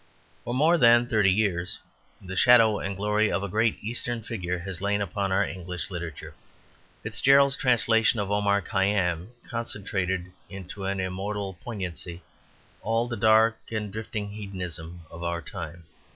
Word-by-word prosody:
For 120 Hz, -, -3 dB
more 160 Hz, +5 st, +4 dB
than 120 Hz, -1 st, +6 dB
thirty 105 Hz, -5 st, +3 dB
years 95 Hz, -3 st, 0 dB, 0.4 s
the 95 Hz, 0 st, -8 dB
shadow 115 Hz, -2 st, +6 dB
and 100 Hz, -1 st, -4 dB
glory 105 Hz, +1 st, +1 dB
of 100 Hz, -, -1 dB
a -, -, -2 dB
great 110 Hz, +3 st, +1 dB
Eastern 120 Hz, +1 st, -3 dB
figure 90 Hz, -6 st, -3 dB
has 90 Hz, 0 st, -4 dB
lain 100 Hz, +1 st, +1 dB
upon 100 Hz, 0 st, -2 dB
our 95 Hz, -, +3 dB
English 90 Hz, -1 st, -6 dB
literature. 85 Hz, -4 st, -6 dB, 0.7 s
Fitzgerald's 140 Hz, 0 st, +4 dB
translation 115 Hz, -3 st, +3 dB
of 100 Hz, -1 st, -2 dB
Omar 100 Hz, 0 st, +2 dB
Khayyam 95 Hz, -3 st, 0 dB, 0.2 s
concentrated 95 Hz, -5 st, -3 dB, 0.2 s
into 95 Hz, +1 st, -8 dB
an 95 Hz, 0 st, -1 dB
immortal 95 Hz, +2 st, -3 dB
poignancy 90 Hz, -5 st, -5 dB, 0.6 s
all 115 Hz, +2 st, 0 dB
the 120 Hz, -, -3 dB
dark 110 Hz, +1 st, +4 dB
and 105 Hz, -3 st, -3 dB
drifting 105 Hz, -1 st, -5 dB
hedonism 90 Hz, -5 st, -6 dB
of 85 Hz, -, -9 dB
our 85 Hz, 0 st, -2 dB
time. 85 Hz, -1 st, -8 dB
100 Hz, 145 wpm, -26 LUFS, 90-110 Hz, 0.7 s, than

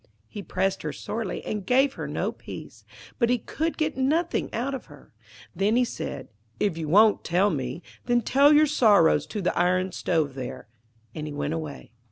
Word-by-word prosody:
He 205 Hz, -, -7 dB
pressed 190 Hz, +1 st, -1 dB
her -, -, -3 dB
sorely, 215 Hz, -4 st, -5 dB
and 210 Hz, -2 st, -3 dB
gave 265 Hz, +6 st, +3 dB
her -, -, -6 dB
no -, -, -2 dB
peace, -, -, -11 dB, 0.3 s
but 235 Hz, -2 st, +3 dB
he 250 Hz, -, +3 dB
could 320 Hz, +8 st, -3 dB
get 310 Hz, -2 st, -1 dB
nothing 310 Hz, +6 st, 0 dB
out 255 Hz, +4 st, -2 dB
of 265 Hz, -, -5 dB
her. 145 Hz, -4 st, -17 dB, 0.4 s
Then 200 Hz, +5 st, +2 dB
he 250 Hz, 0 st, +3 dB
said, 140 Hz, -, -6 dB, 0.3 s
'If 200 Hz, -5 st, +1 dB
you 160 Hz, -2 st, -4 dB
won't 210 Hz, +5 st, +5 dB
tell 185 Hz, +4 st, +2 dB
me, 135 Hz, +2 st, -4 dB, 0.2 s
then 240 Hz, 0 st, +3 dB
tell 280 Hz, +5 st, +5 dB
your 305 Hz, +1 st, +6 dB
sorrows 205 Hz, -, +4 dB
to 210 Hz, -3 st, -4 dB
the 180 Hz, -, 0 dB
iron 185 Hz, +1 st, +1 dB
stove 160 Hz, -5 st, 0 dB
there'; 130 Hz, -5 st, -7 dB, 0.5 s
and 155 Hz, -1 st, -5 dB
he 150 Hz, -, -6 dB
went 145 Hz, +1 st, -2 dB
away. 155 Hz, -7 st, -6 dB
200 Hz, 190 wpm, -26 LUFS, 160-250 Hz, 0.5 s, your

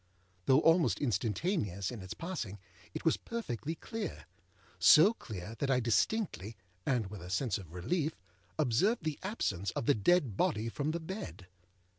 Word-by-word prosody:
Though 135 Hz, +3 st, +6 dB
almost 165 Hz, 0 st, +4 dB
instantaneous 105 Hz, -, -1 dB
in 120 Hz, -5 st, -7 dB
its 95 Hz, 0 st, -7 dB
passing, 165 Hz, -, -4 dB, 0.4 s
it -, -, -5 dB
was 160 Hz, -, +4 dB
perfectly 165 Hz, -, -4 dB
clear; 225 Hz, +5 st, -5 dB, 0.5 s
so 185 Hz, +9 st, +8 dB
clear 105 Hz, -, -7 dB
that 140 Hz, -, 0 dB
I 130 Hz, -2 st, +4 dB
distinctly, 115 Hz, -, 0 dB, 0.3 s
and 125 Hz, -5 st, +2 dB
with 105 Hz, -4 st, -7 dB
a 90 Hz, -, -8 dB
sense 105 Hz, +1 st, 0 dB
of 90 Hz, -5 st, -11 dB
relief, 155 Hz, -, -1 dB, 0.4 s
observed 155 Hz, -, +2 dB
the 155 Hz, -2 st, -2 dB
absence 100 Hz, -, -2 dB
of -, -, -3 dB
the 145 Hz, -, +5 dB
dead 130 Hz, -, +2 dB
body 110 Hz, +3 st, +1 dB
from 145 Hz, +5 st, -2 dB
the 165 Hz, +2 st, -1 dB
bed. 185 Hz, -, -7 dB
135 Hz, 155 wpm, -33 LUFS, 105-170 Hz, 0.5 s, so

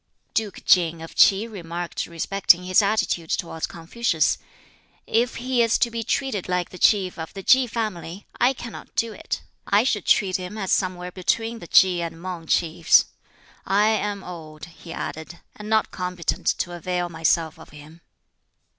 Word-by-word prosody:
Duke 215 Hz, -3 st, -2 dB
King 170 Hz, -2 st, +3 dB
of 165 Hz, -, -10 dB
Ts'i 200 Hz, +2 st, +5 dB
remarked 175 Hz, -5 st, -5 dB
respecting 180 Hz, +1 st, +2 dB
his 185 Hz, +3 st, +4 dB
attitude 200 Hz, -5 st, 0 dB
towards 165 Hz, -2 st, -2 dB
Confucius, 170 Hz, +1 st, 0 dB, 0.7 s
"If 240 Hz, +2 st, +1 dB
he 250 Hz, 0 st, 0 dB
is 230 Hz, -1 st, +3 dB
to 235 Hz, -, +1 dB
be 230 Hz, 0 st, -3 dB
treated 225 Hz, -4 st, -2 dB
like 180 Hz, -1 st, -1 dB
the 185 Hz, -, -10 dB
Chief 190 Hz, -5 st, +3 dB
of 160 Hz, -, -6 dB
the 195 Hz, -, -7 dB
Ki 260 Hz, +3 st, +5 dB
family, 205 Hz, -5 st, -4 dB
I 250 Hz, +2 st, +4 dB
cannot 240 Hz, -2 st, -10 dB
do 230 Hz, -1 st, 0 dB
it. -, -, -5 dB, 0.2 s
I 205 Hz, +2 st, +4 dB
should 215 Hz, -7 st, -1 dB
treat 190 Hz, -3 st, +3 dB
him 185 Hz, +3 st, -7 dB
as 195 Hz, -3 st, -3 dB
somewhere 180 Hz, -1 st, 0 dB
between 225 Hz, +5 st, -1 dB
the 170 Hz, -, -10 dB
Ki 180 Hz, -1 st, +5 dB
and 165 Hz, -1 st, -5 dB
Mang 175 Hz, -2 st, -6 dB
Chiefs. 165 Hz, 0 st, +3 dB, 0.6 s
I 205 Hz, +2 st, +3 dB
am 210 Hz, -2 st, -1 dB
old," 160 Hz, -3 st, -9 dB
he 165 Hz, 0 st, -13 dB
added, 160 Hz, 0 st, -6 dB, 0.2 s
"and 210 Hz, 0 st, -9 dB
not 220 Hz, 0 st, +2 dB
competent 180 Hz, -2 st, -3 dB
to 175 Hz, -, 0 dB
avail 175 Hz, +1 st, -2 dB
myself 165 Hz, -1 st, 0 dB
of -, -, -13 dB
him." 150 Hz, +3 st, -14 dB
185 Hz, 165 wpm, -23 LUFS, 170-215 Hz, 0.7 s, Ts'i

